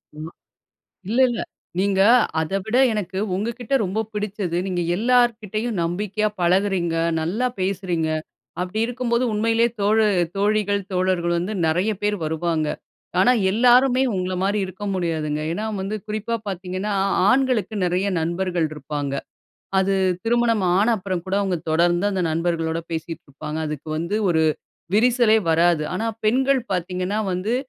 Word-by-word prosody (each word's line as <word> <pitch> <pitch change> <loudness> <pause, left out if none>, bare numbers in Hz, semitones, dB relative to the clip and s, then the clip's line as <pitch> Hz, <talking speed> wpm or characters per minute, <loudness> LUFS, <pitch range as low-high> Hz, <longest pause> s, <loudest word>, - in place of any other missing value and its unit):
ஆமா. 155 +3 -7 0.8
இல்ல, 230 +5 0
இல்ல. 240 - -2 0.4
நீங்க 195 0 +2 0.4
அதவிட 195 +8 -2 0.2
எனக்கு 190 -3 -4 0.2
உங்க 210 +5 -1
கிட்ட 250 +2 -2
ரொம்ப 195 +4 -1
புடிச்சது, 205 -4 -3
நீங்க 180 -2 -1
எல்லார்கிட்டயும் 230 -2 +1
நம்பிக்கையா 205 +5 -1
பழகுகிறீங்க. 180 -1 +1 0.3
நல்லா 205 +11 -1
பேசுறீங்க. 185 -4 -1 0.5
அப்டி 195 +5 -3
இருக்கும்போது, 245 0 0
உண்மையிலயே 225 +2 +2
தோழு 215 +2 +3 0.3
தோழிகள், 205 0 +1
தோழர்கள் 180 -2 +1
வந்து 185 +5 -3
நெறைய 180 +7 +1
பேர் 210 0 +1
வருவாங்க. 160 -1 -1 0.5
ஆனா, 245 +6 +5 0.2
எல்லாருமே 250 +4 +4
உங்கள 185 0 -2
மாரி 200 +2 +1
இருக்க 190 +3 -8
முடியாதுங்க. 155 -4 -1
ஏன்னா, 215 +5 -3
வந்து 195 +3 -3
குறிப்பா 215 +2 -3
பாத்தீங்கன்னா, 185 +2 -3 0.4
ஆண்களுக்கு 250 -5 +1
நெறைய 180 +3 0
நண்பர்கள் 175 0 -1
இருப்பாங்க. 145 -1 -4 0.6
அது 195 +1 +2 0.3
திருமணம் 230 -2 +2 0.2
ஆன 210 +4 +3
அப்புறம் 185 -2 -3
கூட 190 - -2
அவுங்க 190 -3 0
தொடர்ந்து 175 +3 +2
அந்த 190 -2 -1
நண்பர்களோட 165 0 -1
பேசிட்டு 165 0 -5
இருப்பாங்க. 150 +2 -6
அதுக்கு 150 0 -6
வந்து 170 +6 -2
ஒரு 160 -2 +3 0.5
விரிசலே 235 0 +4
வராது. 165 -1 +3
ஆனா 220 +5 -2 0.2
பெண்கள் 265 +4 +3
பாத்தீங்கன்னா 180 +3 -2
வந்து, 195 +7 -1
190 Hz, 130 wpm, -22 LUFS, 170-215 Hz, 0.8 s, ஆனா